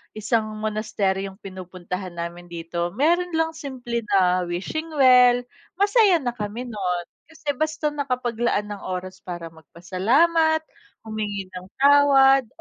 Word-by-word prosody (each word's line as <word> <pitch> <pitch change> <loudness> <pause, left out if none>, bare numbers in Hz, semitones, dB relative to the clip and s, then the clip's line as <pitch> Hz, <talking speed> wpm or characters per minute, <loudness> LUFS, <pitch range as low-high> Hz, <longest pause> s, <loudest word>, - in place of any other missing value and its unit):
isang 215 +1 0 0.2
monasteryong 200 -3 -2
pinupuntahan 185 -1 -7
namin 170 +1 -6
dito, 170 0 -4
meron 340 +5 +1
lang 325 0 +1
simple 255 -6 -5 0.2
na 180 -1 +3
wishing 200 - -4
well, 250 -2 +6 0.3
masaya 405 -1 +4
na 245 - 0
kami, 220 +1 -5
no'n. 180 -6 -2 0.2
Kasi 310 -2 -4
basta 310 -1 -1
nakapaglaan 245 -6 -1
ng 205 - -6
oras 185 +1 -5
para 175 -2 -7
magpasalamat, 265 - +1 0.4
humingi 205 -3 -4
ng 185 0 -9
tawad, 275 -2 +5
220 Hz, 120 wpm, -23 LUFS, 185-285 Hz, 0.4 s, well